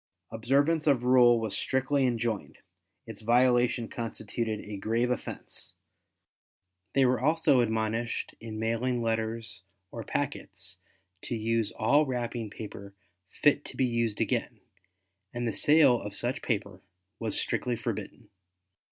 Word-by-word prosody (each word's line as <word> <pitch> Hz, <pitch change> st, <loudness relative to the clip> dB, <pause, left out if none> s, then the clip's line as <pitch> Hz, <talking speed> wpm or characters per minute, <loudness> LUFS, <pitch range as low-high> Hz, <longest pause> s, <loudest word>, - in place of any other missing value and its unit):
Observance 140 Hz, +8 st, +1 dB
of 135 Hz, -4 st, +3 dB
rule 125 Hz, -2 st, +6 dB
was 110 Hz, -1 st, -1 dB
strictly 130 Hz, +1 st, +1 dB
enjoined, 115 Hz, -, -2 dB, 0.5 s
its -, -, -8 dB
violation 120 Hz, 0 st, +3 dB
constituted 115 Hz, -1 st, -3 dB
a 105 Hz, -1 st, -7 dB
grave 115 Hz, +5 st, 0 dB
offense. 125 Hz, -, -5 dB, 1.2 s
They 135 Hz, -1 st, +5 dB
were 125 Hz, -1 st, +2 dB
also 145 Hz, -1 st, +3 dB
admonished 110 Hz, +1 st, -1 dB
in 110 Hz, -1 st, -7 dB
mailing 115 Hz, +2 st, -1 dB
letters 110 Hz, -2 st, -2 dB, 0.3 s
or 115 Hz, -, -6 dB
packets 95 Hz, -11 st, -4 dB, 0.5 s
to 120 Hz, -, -3 dB
use 115 Hz, -1 st, 0 dB
all 145 Hz, +7 st, +3 dB
wrapping 120 Hz, -3 st, -3 dB
paper 100 Hz, -2 st, -9 dB, 0.3 s
fit 145 Hz, +7 st, +2 dB
to -, -, -9 dB
be 130 Hz, -, +3 dB
used 115 Hz, -3 st, -1 dB
again, -, -, -1 dB, 0.7 s
and 120 Hz, 0 st, -1 dB
the 115 Hz, -, -1 dB
sale 145 Hz, -5 st, +5 dB
of 105 Hz, -1 st, -7 dB
such 125 Hz, +6 st, -2 dB
paper 100 Hz, -5 st, -3 dB, 0.4 s
was 110 Hz, -3 st, +3 dB
strictly 125 Hz, -1 st, -1 dB
forbidden. -, -, -6 dB
115 Hz, 125 wpm, -29 LUFS, 110-125 Hz, 1.2 s, rule